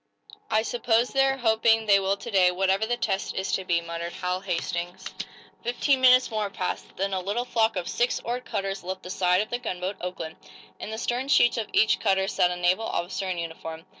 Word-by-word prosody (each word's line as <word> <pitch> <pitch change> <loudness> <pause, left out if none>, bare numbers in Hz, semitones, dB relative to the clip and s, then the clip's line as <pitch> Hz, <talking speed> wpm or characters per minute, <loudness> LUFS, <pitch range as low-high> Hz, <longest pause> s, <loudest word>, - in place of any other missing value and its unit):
"I 220 0 +2
suppose 235 0 +1
they're 270 0 +2
hoping 225 -2 +3
they 200 -2 +5
will 195 +1 0
to 235 - -8
day, 185 -3 +5
whatever 190 +3 +1
the 240 +1 0
test 195 -4 -2
is 190 - -2
to 190 - 0
be," 170 -2 +1
muttered 170 0 -5
Hal 180 0 -2
Hastings. 175 -1 -4 0.5
Fifteen 260 +3 +1
minutes 255 -1 +6
more 215 -2 -1
passed. 185 -2 -4
Then 195 +1 -1
a 190 - 0
little 205 +6 -2
flock 225 -3 +1
of 180 -2 -3
six 240 +1 0
oared 245 +2 -3
cutters 195 -4 -3
left 185 +1 -5
the 180 - -7
side 180 0 +2
of 215 - -5
the 240 - -1
gunboat 185 -4 -4
"Oakland." 175 -3 -5 0.4
In - - -6
the 220 - -5
stern 245 +3 -2
sheets 240 -4 +4
of 220 - -3
each 220 - +3
cutter 190 -2 +2
sat 180 - +2
a 180 - -2
naval 180 +5 +1
officer 185 +2 -3
in 180 - -2
uniform. 165 -1 -6
195 Hz, 210 wpm, -26 LUFS, 180-230 Hz, 0.5 s, minutes